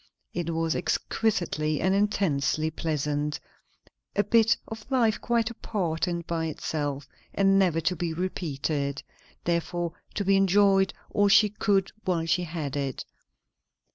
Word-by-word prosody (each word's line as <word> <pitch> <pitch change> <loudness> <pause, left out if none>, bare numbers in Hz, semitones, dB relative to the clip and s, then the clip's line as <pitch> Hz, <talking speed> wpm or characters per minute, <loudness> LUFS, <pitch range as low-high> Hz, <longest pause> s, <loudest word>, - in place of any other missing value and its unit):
It 170 -1 -2
was 165 -1 0
exquisitely 165 -8 0
and 190 +1 +2
intensely 160 -7 +1
pleasant; 150 -2 -2 0.8
a 205 - +3
bit 225 +2 +4
of 220 +1 -9
life 235 -5 +2
quite 235 -1 +1
apart 180 -7 -2
and 170 -1 -3
by 165 -1 -2
itself, 145 -2 -3 0.3
and 195 0 +4
never 175 -4 +3
to 180 +3 0
be 170 0 -2
repeated, 150 -5 -2 0.4
therefore 170 0 -1 0.2
to 200 - -1
be 195 0 +4
enjoyed 195 0 +4 0.2
all 205 0 +3
she 210 +1 +6
could 200 -2 +1
while 175 -4 0
she 175 +2 +1
had 155 -4 -4
it. 140 -2 -3
175 Hz, 135 wpm, -27 LUFS, 155-200 Hz, 0.8 s, she